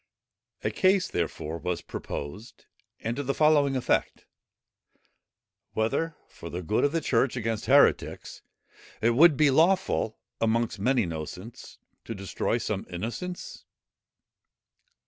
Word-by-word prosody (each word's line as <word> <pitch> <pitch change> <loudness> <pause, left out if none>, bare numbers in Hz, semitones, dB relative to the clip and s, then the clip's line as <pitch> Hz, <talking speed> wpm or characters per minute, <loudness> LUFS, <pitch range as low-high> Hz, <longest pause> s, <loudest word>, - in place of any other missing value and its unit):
A - - 0
case, 190 0 +3
therefore, 85 -1 -3
was 90 -1 -3
proposed, 95 - -7 0.4
and 115 +1 -2
to - - -1
the 140 0 -2
following 150 -3 +4
effect: 130 - 0 1.5
"Whether, 150 +9 0
for 85 - -10
the 90 +3 -5
good 105 +6 +1
of 145 - +3
the 165 0 0
church 130 -2 +1
against 115 -2 -2
heretics, 140 +2 +3 0.6
it 115 +2 +3
would 150 +4 +6
be 150 -1 +5
lawful, 165 - +2 0.2
amongst 115 -1 0
many 125 +3 +2
innocents, 90 +6 -7 0.3
to 115 - -5
destroy 100 +4 -1
some 105 -4 -3
innocents?" 120 - -6
115 Hz, 120 wpm, -27 LUFS, 100-145 Hz, 1.5 s, would